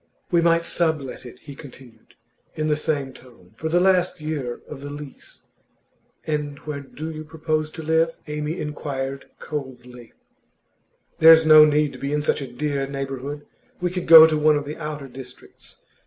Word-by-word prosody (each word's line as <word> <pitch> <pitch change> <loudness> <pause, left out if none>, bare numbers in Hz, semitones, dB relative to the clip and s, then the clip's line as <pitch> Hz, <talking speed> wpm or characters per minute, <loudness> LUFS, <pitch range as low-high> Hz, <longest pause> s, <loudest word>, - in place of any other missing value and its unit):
'We 170 -1 +3
might 170 0 +3
sublet 155 -8 -2
it,' 125 - -14
he 145 - -10
continued, 130 -5 -15 0.4
in 155 -1 -2
the 150 - +2
same 145 -3 -2
tone, 115 -9 -18
'for 160 +8 -5
the 175 +2 +3
last 180 -2 +2
year 150 -6 -4
of 140 -2 -9
the 145 - -7
lease.' 145 -1 -11 0.8
'And 150 -2 -3
where 150 -2 -4
do 150 +3 -8
you 155 0 -7
propose 155 0 -3
to 160 +1 -9
live?' 160 +1 +1
Amy 150 +2 -4
inquired, 140 -2 -5
coldly. 125 -5 -8 1.1
'There's 160 0 +8
no 155 -1 +9
need 150 -1 +1
to - - -11
be 140 +1 -3
in 150 0 0
such 150 - 0
a 135 -3 -7
dear 140 +1 -2
neighbourhood. 135 +1 -6 0.3
We 180 -1 -1
could 180 -1 -4
go 160 -1 +11
to 155 -1 +1
one 150 0 +4
of 145 - -4
the 150 +2 -7
outer 150 -3 -6
districts. 125 -1 -12
150 Hz, 170 wpm, -22 LUFS, 135-155 Hz, 1.1 s, go